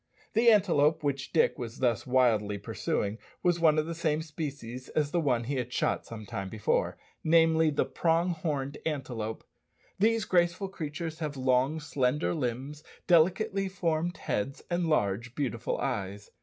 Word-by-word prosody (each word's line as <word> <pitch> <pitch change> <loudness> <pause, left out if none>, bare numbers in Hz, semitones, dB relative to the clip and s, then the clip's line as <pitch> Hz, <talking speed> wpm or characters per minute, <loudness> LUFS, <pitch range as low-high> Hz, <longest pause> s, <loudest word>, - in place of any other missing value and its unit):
The 235 +2 +5
antelope 165 -7 +4
which 140 -1 -2
Dick 160 - +2
was 115 -2 -6
thus 120 -3 0
wildly 115 -5 +2
pursuing 100 +1 -2 0.2
was 175 -1 +2
of 155 -2 +4
the 170 - -4
same 160 -2 0
species 140 -6 -6
as 150 -2 0
the 175 - +1
one 125 -7 +1
he 135 +3 -2
had 125 -1 -3
shot - - 0
some 110 -2 -8
time 100 -1 -5
before 110 0 0 0.3
namely, 160 0 +4
the 145 - +1
prong 165 +6 +1
horned 145 -4 -3
antelope. 125 -8 -3 0.6
These 225 +1 +3
graceful 175 +2 +1
creatures 160 -2 -5
have 150 -3 -4
long, 130 +4 +2
slender 145 -1 0
limbs, 140 +1 -3 0.2
delicately 190 +4 +3
formed 175 -2 -1
heads, 135 +7 -3
and 175 -1 +1
large, 115 -5 0
beautiful 120 -5 -2
eyes. 100 -5 -3
150 Hz, 150 wpm, -29 LUFS, 125-165 Hz, 0.6 s, The